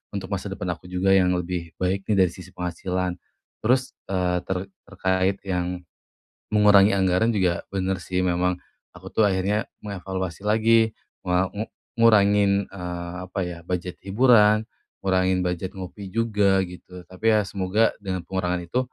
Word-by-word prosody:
untuk 95 0 -5
masa 100 +1 -2
depan 90 -2 -3
aku 85 +1 -8
juga 90 +2 +1
yang 90 -2 +4
lebih 85 -1 -4
baik, 95 +1 -2
nih, 105 - +2
dari - - -6
sisi 90 +1 -13
penghasilan. 90 +1 -3 0.4
Terus, 130 +3 +2 0.2
eee, 90 -2 +1
ter 95 - -1 0.3
terkait 95 +1 0
yang 90 -1 -2 0.6
mengurangi 105 -1 +6
anggaran, 95 +4 +2
juga, 90 -3 +1
bener 95 -1 -1
sih. 90 +1 -1
Memang, 90 0 +1 0.4
aku - - -11
tuh 110 - +3
akhirnya 100 +4 0 0.2
mengevaluasi 95 -3 -5
lagi, 110 +1 +4 0.4
me 90 +1 +3
ngu 105 +2 -3 0.4
ngurangin, 105 -3 +5 0.2
eee, 90 -2 -6
apa 95 - -4
ya, 85 -1 -6
budget 90 0 -4
hiburan, 105 0 +4 0.4
ngurangin 95 -1 +2
budget 90 +2 -3
ngopi 95 +1 -7
juga, 105 -3 +2
gitu. 90 0 -11
Tapi 95 +4 -11
ya, 105 - +1
semoga, 100 +3 +1
dengan 95 -3 -4
pengurangan 90 -1 -1
itu, 85 +9 -1
95 Hz, 150 wpm, -24 LUFS, 90-100 Hz, 0.6 s, mengurangi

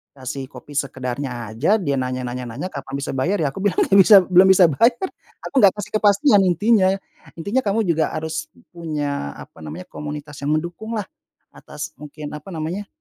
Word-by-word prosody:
kasih 135 0 -6
kopi 130 +3 -12
sekedarnya 135 -1 -3 0.3
aja 135 +11 0
dia 140 -6 0
nanya 130 0 -2
nanya 125 +1 -5
nanya 135 +11 -5
kapan - - -7
bisa 140 - -4
bayar 175 +10 +1
ya 150 - +2
aku 140 - -8
bilang 200 -3 +1
gak 195 - +2
bisa 200 +2 +9
belum 185 +1 +5
bisa 185 -1 +7
belum 145 -4 -3
bisa 235 +2 +7
bayar 380 - -2 0.4
aku - - -7
gak 195 - +7
kasih 205 - -6
kepastian 205 +1 +4
intinya. 205 +3 +3 0.5
Intinya 200 +10 0
kamu 205 +2 +1
juga 160 -1 +2
harus 160 - -4 0.2
punya 145 - -3
apa - - -13
namanya 80 +4 -7
komunitas 150 0 -7
yang 145 - 0
mendukunglah 205 +7 -4 0.5
atas 150 +1 -8
mungkin 150 0 -8
apa 150 +6 -10
namanya, 170 +6 -4
155 Hz, 185 wpm, -21 LUFS, 140-195 Hz, 0.5 s, bisa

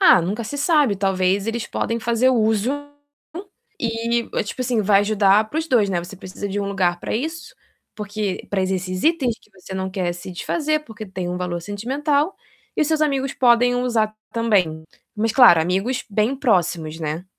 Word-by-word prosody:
Ah, 370 - +7
nunca 210 +7 -3
se 285 - -5
sabe. 295 - +3
Talvez 190 +1 +1
eles 230 0 -2
podem 230 0 -2
fazer 235 +3 +2
uso 220 -1 +2 1.1
e, 235 0 -1 0.2
tipo 210 - -7
assim, 240 -2 0
vai 200 0 +4
ajudar 205 0 +3
para 310 - -2
os 320 - -2
2, 230 -7 +3
né. 180 - 0
Você 180 +3 -10
precisa 190 +2 -7
de 200 +1 -2
um 200 - -2
lugar 180 -3 0
para - - -3
isso, 320 +8 -4 0.4
porque 210 -2 -4
para 195 -2 0
esses 185 -1 -2
itens 275 -8 +2
que - - -26
você 190 0 -10
não 190 0 -3
quer 185 -2 -1
se 175 +2 -9
desfazer, 305 - -1
porque 220 -4 -9
têm 185 -2 -5
um 180 - -3
valor 180 -1 -3
sentimental, 280 - -1 0.4
e - - 0
os - - +1
seus 315 -1 +1
amigos 275 -2 0
podem 245 0 +4
usar 230 -4 0 0.2
também. 190 -9 +1 0.3
Mas, 220 +1 0
claro, 240 -11 +7
amigos 195 +10 -1
bem 215 +5 +1
próximos, 175 - 0
né? 155 +2 -3
215 Hz, 185 wpm, -21 LUFS, 190-245 Hz, 1.1 s, Ah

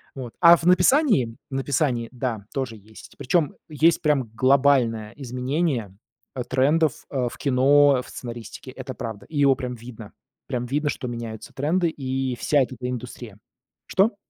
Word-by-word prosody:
Вот. 125 -3 -7
А 170 -1 +9
в 165 - -7
написании 180 - +4 0.2
в - - -8
написании 135 -3 0
да, 120 -5 -4
тоже 130 -5 -3
есть. 110 +2 -15
Причем 150 +2 0
есть 160 +2 +2
прям 135 -7 +1
глобальное 130 -4 +3
изменение, 130 - -2 0.4
э, 125 - -2
трендов 145 +4 +2 0.2
ф 125 -3 -1
в - - -11
кино, 140 0 +4
в - - -13
сценаристике. 120 +1 -8
Это 130 0 -7
правда. 110 -5 -7
И 155 - -7
его 140 -2 +5
прям 125 -1 -5
видно. 115 -2 -11 0.3
Прям 125 -2 -2
видно, 145 +3 -1
что 125 - -4
меняются 115 -2 -7
тренды 165 +5 +1
и 130 -3 -3
вся 145 - +2
вот 130 - -1
эта 125 0 -6
индустрия. 120 -3 -7 0.5
Что? 200 +3 +2
130 Hz, 160 wpm, -24 LUFS, 120-145 Hz, 0.5 s, А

